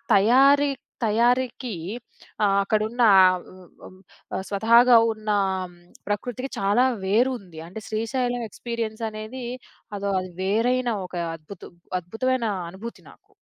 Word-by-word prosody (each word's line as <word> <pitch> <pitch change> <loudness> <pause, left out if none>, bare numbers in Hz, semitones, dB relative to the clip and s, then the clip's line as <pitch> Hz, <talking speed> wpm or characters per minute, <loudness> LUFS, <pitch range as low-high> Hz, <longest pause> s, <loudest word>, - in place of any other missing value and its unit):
తయారీ 270 +8 +5 0.4
తయారీకి, 245 +2 +1 0.7
ఆహ్, 200 -1 +3
అక్కడున్న 215 +4 0 0.5
ఉ - - -15 0.3
హ్మ్. 185 - -16 0.4
ఆహ్, - - -3
స్వతహాగా 235 +4 +6 0.2
ఉన్న 215 -1 -4 0.8
ప్రకృతికి 245 +6 -3
చాలా 205 +6 +3 0.2
వేరు 230 +7 +3
ఉంది. 175 -5 -12
అంటే 215 +5 -8
శ్రీశైలం 245 +2 -1
ఎక్స్‌పీరియన్సనేది 225 +1 -5 0.5
అదో 200 0 -2
అది 185 0 -8
వేరైన 240 +5 +1 0.2
ఒక 180 - -10 0.2
అద్భుతం. 165 +4 -12 0.3
అద్భుతమైన 235 +7 -1 0.3
అనుభూతి 230 +5 -9
నాకు. - - -25
225 Hz, 105 wpm, -24 LUFS, 200-245 Hz, 0.8 s, స్వతహాగా